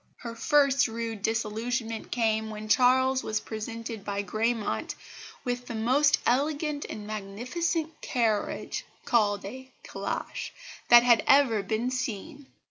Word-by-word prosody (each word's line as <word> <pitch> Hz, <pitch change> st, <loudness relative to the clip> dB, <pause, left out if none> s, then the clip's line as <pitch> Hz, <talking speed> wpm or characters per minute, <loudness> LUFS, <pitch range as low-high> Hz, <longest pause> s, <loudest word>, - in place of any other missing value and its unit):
Her 235 Hz, -1 st, -7 dB
first 275 Hz, +2 st, +3 dB
rude 225 Hz, -2 st, -4 dB
disillusionment 225 Hz, +2 st, -2 dB
came 220 Hz, -2 st, 0 dB
when 215 Hz, 0 st, -7 dB
Charles 260 Hz, +3 st, +4 dB
was 215 Hz, 0 st, -1 dB
presented 225 Hz, 0 st, -6 dB
by 200 Hz, 0 st, -2 dB
Gramont 220 Hz, +3 st, -1 dB, 0.5 s
with 245 Hz, -1 st, -3 dB
"the 235 Hz, -, -5 dB
most 260 Hz, +7 st, +3 dB
elegant 290 Hz, +3 st, 0 dB
and 210 Hz, -, -6 dB
magnificent 255 Hz, -, -3 dB
carriage 225 Hz, -4 st, -1 dB, 0.2 s
(called 205 Hz, -4 st, +2 dB
a 260 Hz, +6 st, -8 dB
'calash') -, -, -4 dB, 0.4 s
that 240 Hz, 0 st, +9 dB
had 235 Hz, -2 st, +5 dB
ever 265 Hz, -6 st, +5 dB
been 220 Hz, +5 st, -1 dB
seen." 260 Hz, +3 st, -4 dB
235 Hz, 125 wpm, -28 LUFS, 215-260 Hz, 0.5 s, that